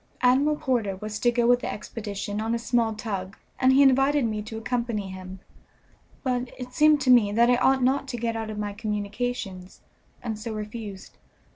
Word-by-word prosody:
Admiral 270 +5 +4
Porter 235 -9 -1
was 210 +2 -6
to 240 - +3
go 240 0 +1
with 245 +1 +5
the - - -4
expedition 205 -1 -5
on 225 +1 0
a - - 0
small 230 -1 0
tug, 195 -4 -5 0.2
and 260 0 +5
he 275 +2 +6
invited 270 +1 +4
me 215 -2 -2
to 220 +1 -7
accompany 230 -3 -2
him, 185 0 -9 0.8
but 250 -2 -1
it 250 0 -8
seemed 305 -1 +5
to 265 -2 +3
me 225 -5 +5
that 235 +3 +4
I - - +5
ought 265 +1 +3
not 275 +2 +1
to 250 -2 -4
get 230 0 -2
out 225 -1 -4
of 215 - -6
my 205 -1 -3
communications, 210 -2 -4 0.4
and 220 -3 -4
so 220 0 -5
refused. 210 -2 -7
230 Hz, 190 wpm, -26 LUFS, 210-250 Hz, 0.8 s, he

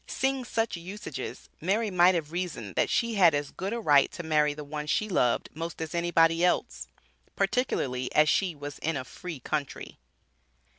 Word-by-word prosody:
Seeing 265 -1 -1
such 225 -5 -1
usages, 170 -6 -7
Mary 205 +5 0
might 180 0 +5
have 155 -3 -3
reasoned 165 - -4
that - - +1
she 235 -1 +1
had 175 -7 +5
as 145 0 -2
good 190 +2 -4
a 235 - -2
right 145 -9 +4
to 170 - -6
marry 150 -2 +2
the 150 - -7
one 150 +1 -5
she 215 +7 +1
loved 125 - +1
most 165 +2 -6
as 160 0 -5
anybody 170 -1 +3
else, 180 - 0 0.5
particularly 130 - 0
as 155 0 +6
she 180 +1 +1
was 145 -1 -8
in 160 -1 -1
a 130 - -5
"free 165 +3 -8
country." 145 +2 -4
165 Hz, 180 wpm, -28 LUFS, 145-185 Hz, 0.5 s, as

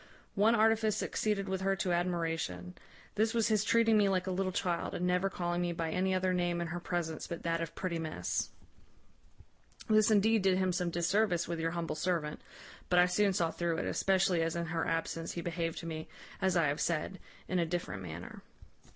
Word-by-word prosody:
One 215 +4 +4
artifice 220 -1 +3
succeeded 210 -3 -1
with 190 0 -2
her 195 0 +1
to 190 -1 -1
admiration. 175 0 -1 0.4
This 220 +2 +1
was 230 -1 +2
his 215 -2 +3
treating 225 -1 +4
me 200 -1 +4
like 185 -1 +1
a 190 - -2
little 185 +1 -1
child, 175 -1 -1
and 180 - -1
never 180 +2 +2
calling 175 -2 -2
me 175 -1 -1
by 165 -1 -2
any 185 +2 +1
other 185 0 +1
name 175 -1 0
in 170 - -1
her 175 +1 -3
presence 170 -2 -3
but 170 - -6
that 165 0 0
of 165 0 -5
pretty 175 -3 -2
miss. 160 -1 -2 1.4
This 215 0 +4
indeed 220 +1 +4
did 190 -1 +3
him 185 -1 +1
some 180 -1 0
disservice 175 +1 +1
with 170 -1 -3
your 165 0 0
humble 170 -1 -2
servant; 155 -2 -2 0.5
but 180 - +3
I 180 - +7
soon 195 +3 +2
saw 170 -3 0
through 170 -1 -1
it, - - -2
especially 190 -3 +2
as 165 0 -1
in 170 0 -1
her 165 0 -2
absence 165 0 -2
he 170 - -4
behaved 165 -1 -3
to - - -9
me, 160 -1 -5 0.3
as 190 -2 +2
I 165 - +4
have 145 +2 0
said, 170 +3 -1 0.3
in 185 - 0
a 170 - +2
different 165 - -3
manner. 85 -1 -8
180 Hz, 205 wpm, -32 LUFS, 165-195 Hz, 1.4 s, I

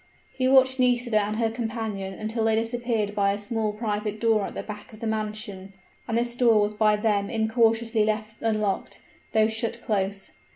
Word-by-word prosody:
He 255 -1 0
watched 260 0 +5
Nisida 245 -3 +3
and 210 +1 -2
her 225 0 0
companion 220 -4 -4
until 220 +1 -2
they 220 -1 +3
disappeared 230 -2 -1
by 200 -1 +2
a - - -3
small 215 +1 -1
private 210 -1 -3
door 220 -3 +2
at - - -7
the - - -4
back 210 -1 -9
of 215 - -12
the 230 - -5
mansion; 215 -3 -4 0.3
and 230 -1 0
this 240 0 0
door 235 -3 +4
was 205 0 +1
by 210 0 +3
them 210 -2 0
incautiously 225 0 +2
left 215 0 -1
unlocked, 215 -3 -1 0.3
though 220 -1 +5
shut 225 +1 -3
close. 195 -2 -2
220 Hz, 180 wpm, -25 LUFS, 210-230 Hz, 0.3 s, watched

